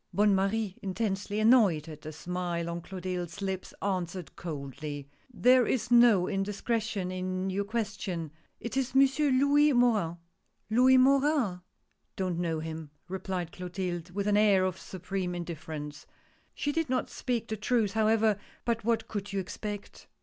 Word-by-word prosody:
Bonne 205 Hz, 0 st, +4 dB
Marie 195 Hz, +1 st, 0 dB
intensely 200 Hz, +1 st, -2 dB
annoyed 215 Hz, -, +4 dB
at 155 Hz, -2 st, -9 dB
the 155 Hz, -, -7 dB
smile 175 Hz, +1 st, -3 dB
on 170 Hz, 0 st, -4 dB
Clo 190 Hz, +2 st, -8 dB
tilde's 180 Hz, -1 st, -4 dB
lips 190 Hz, -2 st, -3 dB
answered 185 Hz, -4 st, -3 dB
coldly: 145 Hz, -2 st, -6 dB
" -, -, -35 dB
There 250 Hz, 0 st, +4 dB
is 245 Hz, -1 st, -1 dB
no 235 Hz, -6 st, +6 dB
indiscretion 205 Hz, 0 st, -1 dB
in 185 Hz, +1 st, -2 dB
your 200 Hz, +2 st, -1 dB
question 200 Hz, -7 st, -3 dB
— -, -, -41 dB
it 235 Hz, -, -5 dB
is 265 Hz, -1 st, -1 dB
Monsieur 275 Hz, +2 st, +4 dB
Louis 285 Hz, +3 st, +4 dB
Morin." 215 Hz, -9 st, +2 dB, 0.3 s
" -, -, -47 dB
Louis 255 Hz, +3 st, +6 dB
Morin? 270 Hz, -, +3 dB, 0.3 s
— -, -, -47 dB
Don't 185 Hz, -3 st, -2 dB
know 165 Hz, -2 st, -1 dB
him," 160 Hz, -1 st, -6 dB, 0.2 s
replied 185 Hz, -2 st, -3 dB
Clotilde, 180 Hz, -1 st, -4 dB
with 200 Hz, +3 st, -3 dB
an 205 Hz, 0 st, +3 dB
air 200 Hz, -3 st, +5 dB
of 185 Hz, 0 st, -2 dB
supreme 185 Hz, 0 st, -4 dB
indifference. 160 Hz, -3 st, -6 dB, 0.5 s
She 290 Hz, -, -1 dB
did 325 Hz, -1 st, -1 dB
not 255 Hz, -, -1 dB
speak 240 Hz, -3 st, -2 dB
the 220 Hz, -, -2 dB
truth, 215 Hz, -1 st, +1 dB
however 220 Hz, -1 st, +3 dB
— -, -, -29 dB
but 230 Hz, -2 st, 0 dB
what 225 Hz, 0 st, 0 dB
could 205 Hz, -1 st, -5 dB
you 200 Hz, -, -1 dB
expect? 205 Hz, +2 st, -6 dB
195 Hz, 165 wpm, -29 LUFS, 180-230 Hz, 0.5 s, no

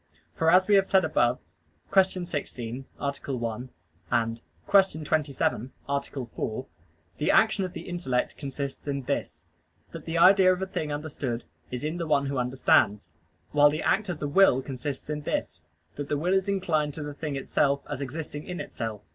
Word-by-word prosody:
For 160 Hz, -, +2 dB
as 185 Hz, +2 st, +5 dB
we 210 Hz, -, +3 dB
have 195 Hz, -1 st, +5 dB
said 190 Hz, -3 st, +4 dB
above 125 Hz, -6 st, +2 dB, 0.6 s
(Q. 185 Hz, -2 st, +3 dB
16, 130 Hz, -6 st, -5 dB
A. 140 Hz, -1 st, -1 dB
1; 125 Hz, -2 st, -4 dB, 1.0 s
Q. 195 Hz, -5 st, +5 dB
27, 140 Hz, -5 st, 0 dB, 0.2 s
A. 140 Hz, 0 st, +1 dB
4), 130 Hz, -3 st, -5 dB, 0.5 s
the 150 Hz, -, +1 dB
action 215 Hz, -3 st, +4 dB
of 180 Hz, -, -7 dB
the -, -, -6 dB
intellect 155 Hz, -9 st, -2 dB
consists 140 Hz, 0 st, -5 dB
in 140 Hz, -1 st, -2 dB
this -, -, -3 dB, 0.5 s
that -, -, -8 dB
the 165 Hz, +1 st, -2 dB
idea 185 Hz, +2 st, +7 dB
of 180 Hz, -, 0 dB
the 190 Hz, -, -1 dB
thing 155 Hz, -5 st, -3 dB
understood 145 Hz, -5 st, -3 dB, 0.3 s
is 125 Hz, +1 st, -5 dB
in 155 Hz, +3 st, -2 dB
the 170 Hz, -2 st, -3 dB
one 145 Hz, -2 st, +3 dB
who 140 Hz, -1 st, -1 dB
understands; 120 Hz, -6 st, +2 dB, 0.4 s
while 145 Hz, 0 st, +6 dB
the 155 Hz, +2 st, -3 dB
act 215 Hz, -3 st, +1 dB
of 175 Hz, -, -2 dB
the 150 Hz, -, -3 dB
will 145 Hz, -5 st, +5 dB
consists 135 Hz, +1 st, -5 dB
in 150 Hz, 0 st, -3 dB
this 115 Hz, -, -3 dB, 0.4 s
that 145 Hz, -1 st, -4 dB
the 145 Hz, -, +1 dB
will 175 Hz, +6 st, +1 dB
is 190 Hz, +1 st, +2 dB
inclined 155 Hz, -7 st, 0 dB
to 155 Hz, -, -5 dB
the 145 Hz, 0 st, -5 dB
thing 150 Hz, -1 st, -4 dB
itself 140 Hz, +1 st, +1 dB
as 145 Hz, -2 st, -4 dB
existing 145 Hz, +2 st, -5 dB
in 180 Hz, -1 st, -5 dB
itself. 110 Hz, -2 st, -5 dB
145 Hz, 180 wpm, -27 LUFS, 135-175 Hz, 1.0 s, idea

